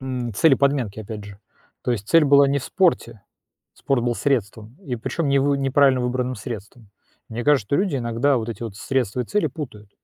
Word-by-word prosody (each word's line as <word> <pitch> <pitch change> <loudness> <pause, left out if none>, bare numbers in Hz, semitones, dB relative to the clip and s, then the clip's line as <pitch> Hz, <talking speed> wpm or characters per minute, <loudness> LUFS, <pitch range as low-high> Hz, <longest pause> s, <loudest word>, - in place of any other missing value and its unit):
М, 125 -3 -4
цели 155 +6 +5
подменки 130 -6 0
опять 105 -1 -7
же. 100 -1 -12 0.4
То - - -2
есть 105 -4 -5
цель 165 -2 +5
была 140 0 +6
не 140 +1 +1
в 130 - -8
спорте, 170 - 0 0.5
спорт 135 -3 -1
был 120 -1 0
средством 115 -3 -2
и 125 -4 -3
причём 140 +6 -3
не 140 - +3
вы 140 +1 +2
неправильно 135 -1 +3
выбранным 125 +1 -1
средством. 110 -1 -9 0.4
Мне 115 +2 -5
кажется, 145 -8 +3
что 140 - +1
люди 185 -5 0
иногда 120 +3 +1
вот 115 -1 -3
эти 115 0 -6
вот 110 -4 -6
средства 125 -1 -1
и - - -2
цели 210 - 0
путают. 110 - -8
125 Hz, 205 wpm, -22 LUFS, 110-140 Hz, 0.5 s, была